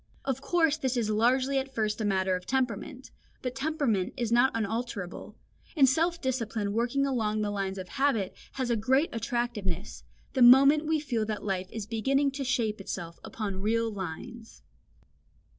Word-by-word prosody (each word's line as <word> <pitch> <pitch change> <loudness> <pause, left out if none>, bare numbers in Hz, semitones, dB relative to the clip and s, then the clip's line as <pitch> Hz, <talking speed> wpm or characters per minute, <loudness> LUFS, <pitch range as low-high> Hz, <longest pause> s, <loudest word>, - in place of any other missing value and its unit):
Of 270 -1 -1
course 325 -1 +2
this 260 -4 -1
is 220 -3 0
largely 255 +5 +2
at 265 0 -5
first 215 -1 -1
a - - 0
matter 190 -2 +1
of 180 0 -7
temperament, 260 +1 -2 0.3
but 250 -1 -2
temperament 265 -9 -1
is 235 -2 -2
not 245 +3 +5
unalterable; 220 -4 -4 0.4
and 275 -3 +7
self 330 +6 +1
discipline 230 -6 -2
working 240 +5 +1
along 215 -5 0
the 205 - -1
lines 195 -1 -3
of 185 -1 -6
habit 270 -6 0 0.2
has 255 -3 -2
a - - +3
great 265 +8 +2
attractiveness, 225 -6 -3 0.3
the 260 - 0
moment 275 +5 +7
we 315 -1 +2
feel 245 -7 -1
that 215 -1 -4
life 190 -2 -2
is 220 -3 -5
beginning 270 +6 +1
to 275 0 -4
shape 230 -5 -1
itself 170 -3 -6
upon 200 -4 -4
real 225 +2 +1
lines. 210 +5 -8
235 Hz, 165 wpm, -28 LUFS, 210-270 Hz, 0.4 s, and